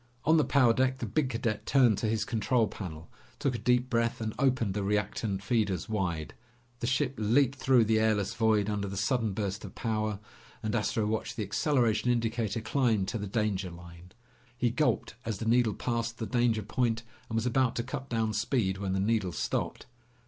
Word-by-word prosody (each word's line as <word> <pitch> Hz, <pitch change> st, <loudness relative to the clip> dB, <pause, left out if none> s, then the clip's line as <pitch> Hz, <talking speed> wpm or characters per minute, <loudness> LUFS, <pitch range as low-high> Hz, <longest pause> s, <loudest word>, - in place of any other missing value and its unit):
On 160 Hz, +2 st, +5 dB
the 155 Hz, -, +4 dB
power 130 Hz, -6 st, +4 dB
deck, 130 Hz, +2 st, +1 dB
the -, -, -4 dB
big 150 Hz, -4 st, 0 dB
cadet 115 Hz, -3 st, -2 dB
turned 125 Hz, -7 st, +4 dB
to 110 Hz, -, 0 dB
his 110 Hz, 0 st, 0 dB
control 115 Hz, -1 st, +1 dB
panel, 80 Hz, -7 st, -7 dB, 0.3 s
took 135 Hz, -, 0 dB
a 120 Hz, -, -3 dB
deep 125 Hz, 0 st, +2 dB
breath, 115 Hz, -1 st, 0 dB
and 110 Hz, -1 st, -3 dB
opened 130 Hz, -7 st, +2 dB
the 105 Hz, -, -2 dB
reactant 100 Hz, 0 st, -1 dB
feeders 100 Hz, -5 st, 0 dB
wide. 95 Hz, -8 st, -2 dB, 0.5 s
The 120 Hz, -, -2 dB
ship 130 Hz, +1 st, +1 dB
leaped 130 Hz, +5 st, +2 dB
through 125 Hz, -4 st, +4 dB
the 110 Hz, 0 st, +3 dB
airless 110 Hz, -2 st, +1 dB
void 110 Hz, -3 st, +2 dB
under 100 Hz, -1 st, -1 dB
the 100 Hz, 0 st, -5 dB
sudden 110 Hz, 0 st, 0 dB
burst 100 Hz, 0 st, -3 dB
of -, -, -9 dB
power 110 Hz, -3 st, -1 dB, 0.4 s
and 110 Hz, -, -1 dB
Astro 110 Hz, -1 st, 0 dB
watched 110 Hz, +1 st, -2 dB
the 110 Hz, -, -2 dB
acceleration 120 Hz, +1 st, +1 dB
indicator 115 Hz, -2 st, 0 dB
climb 110 Hz, -3 st, +1 dB
to 110 Hz, +4 st, -3 dB
the 105 Hz, -, -4 dB
danger 100 Hz, -3 st, -1 dB
line. 85 Hz, +1 st, -13 dB, 0.4 s
He 120 Hz, -1 st, +1 dB
gulped 150 Hz, +5 st, 0 dB
as 115 Hz, -4 st, -3 dB
the 110 Hz, -, -5 dB
needle 115 Hz, -2 st, +3 dB
passed 115 Hz, -2 st, -2 dB
the 115 Hz, -, -3 dB
danger 120 Hz, -3 st, +1 dB
point 115 Hz, +1 st, 0 dB, 0.3 s
and 110 Hz, -, -3 dB
was 115 Hz, +1 st, 0 dB
about 125 Hz, 0 st, +2 dB
to 120 Hz, -, -1 dB
cut 135 Hz, +1 st, -6 dB
down 110 Hz, -2 st, 0 dB
speed 105 Hz, -3 st, 0 dB
when 95 Hz, -2 st, -2 dB
the 95 Hz, -, 0 dB
needle 105 Hz, -2 st, +1 dB
stopped. -, -, -2 dB
110 Hz, 195 wpm, -29 LUFS, 105-120 Hz, 0.5 s, On